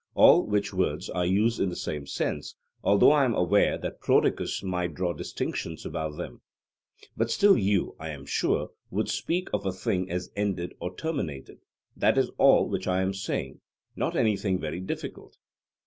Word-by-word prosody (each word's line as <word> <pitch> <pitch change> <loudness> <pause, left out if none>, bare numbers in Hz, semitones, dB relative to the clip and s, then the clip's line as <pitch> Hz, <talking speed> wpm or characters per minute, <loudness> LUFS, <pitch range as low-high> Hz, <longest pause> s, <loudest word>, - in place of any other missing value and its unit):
all - - +7
which 105 -1 0
words 90 -2 -1
I 90 -1 0
use 105 +6 +2
in 95 - +1
the 90 - -5
same 75 -2 -4
sense, - - -3 0.3
although 100 +7 +6
I 150 -2 +4
am 120 -4 +1
aware 90 - +3
that - - -6
Prodicus - - +1
might 90 -4 -2
draw 90 -1 -1
distinctions 80 -1 -4
about 80 -1 -4
them: - - -7 0.7
but 115 0 0
still 200 - +5
you, 100 -3 +1
I 80 0 -6
am 70 -2 -7
sure, 70 - 0 0.2
would - - -1
speak 180 +2 -1
of 105 - 0
a 95 - 0
thing 95 0 -2
as 90 0 -4
ended 95 -4 -2
or 90 +1 -5
terminated 85 - -4 0.4
that - - +2
is - - +2
all - - +6
which - - -3
I 95 0 +2
am 95 +1 0
saying 95 +1 -4 0.3
not - - -1
anything 100 -3 +1
very 85 +1 -4
difficult. 95 - -6
95 Hz, 175 wpm, -27 LUFS, 85-105 Hz, 0.7 s, all